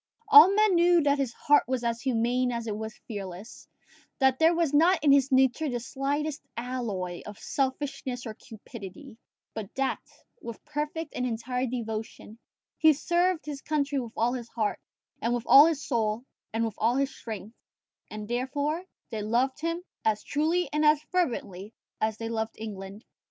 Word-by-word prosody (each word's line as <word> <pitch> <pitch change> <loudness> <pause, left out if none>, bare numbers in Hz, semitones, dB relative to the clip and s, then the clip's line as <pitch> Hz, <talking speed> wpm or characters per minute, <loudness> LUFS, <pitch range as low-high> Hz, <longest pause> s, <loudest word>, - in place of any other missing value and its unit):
All 430 -3 +10
men 425 -2 +4
knew 345 -1 +4
that 285 0 +2
his 265 -4 0
heart 295 +3 +3
was 255 -1 -1
as 230 -1 -1
humane 245 0 +1
as 235 -1 -3
it 215 -2 -3
was 220 0 -6
fearless; 200 -1 -8 0.5
that 265 -2 +3
there 325 +1 +5
was 330 -4 +1
not 335 +6 +5
in 290 - +5
his 275 0 +4
nature 265 +3 +3
the 245 -2 -2
slightest 285 +4 -2 0.2
alloy 225 -8 -4
of 210 -1 -8
selfishness 265 0 -3
or 220 - -5
cupidity; 220 +3 -11 0.3
but 215 -3 -6
that, 270 0 0 0.4
with 235 -2 -9
perfect 300 +1 -4
and 250 - -1
entire 250 +2 -2
devotion, 225 -2 -6 0.4
he 315 -1 +6
served 345 +3 0
his 290 -2 -6
country 290 -2 -1
with 235 -3 -6
all 235 +2 +2
his 240 -2 -6
heart, 220 -3 -2 0.4
and 235 +1 +1
with 240 - -3
all 285 +3 +9
his 305 -4 -2
soul, 225 -2 0 0.3
and 225 +1 0
with 225 - -3
all 230 +3 +2
his 275 0 0
strength; 220 -1 -7 0.6
and 210 -1 -7
therefore, 285 +7 -2 0.3
they 220 -2 -3
loved 245 +7 0
him 335 +2 -2 0.2
as 215 -1 +1
truly 325 +5 0
and 300 +1 +1
as 300 -1 +5
fervently 225 - -2 0.3
as 220 0 0
he 225 - -4
loved 225 -1 -3
England. 205 -1 -8
250 Hz, 170 wpm, -28 LUFS, 225-295 Hz, 0.6 s, All